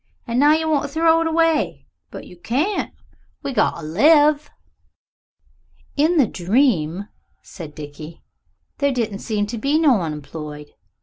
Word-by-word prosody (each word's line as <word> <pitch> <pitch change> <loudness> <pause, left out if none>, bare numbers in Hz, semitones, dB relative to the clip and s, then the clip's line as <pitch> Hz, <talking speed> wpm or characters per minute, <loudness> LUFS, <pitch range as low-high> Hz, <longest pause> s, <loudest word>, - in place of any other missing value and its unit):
And 235 0 -1
now 295 +2 +6
you 320 0 0
want 300 -3 +2
to - - -12
throw 325 +2 +3
it 330 - 0
away. 325 -1 +1 0.2
But - - -9
you - - -13
can't. 275 - -2 0.5
We 275 - -3
got 215 - +2
to 160 - -8
live." 295 - +4 1.5
"In 315 +4 +2
the 280 - +5
dream," 195 - 0 0.4
said 160 -6 -10
Dickie, 150 +2 -10 0.6
"there 280 -1 +2
didn't 225 -6 -2
seem 210 -2 -2
to 225 +2 -6
be 280 +6 +1
no 280 - +3
unemployed. 150 -1 -7
245 Hz, 145 wpm, -21 LUFS, -, 1.5 s, now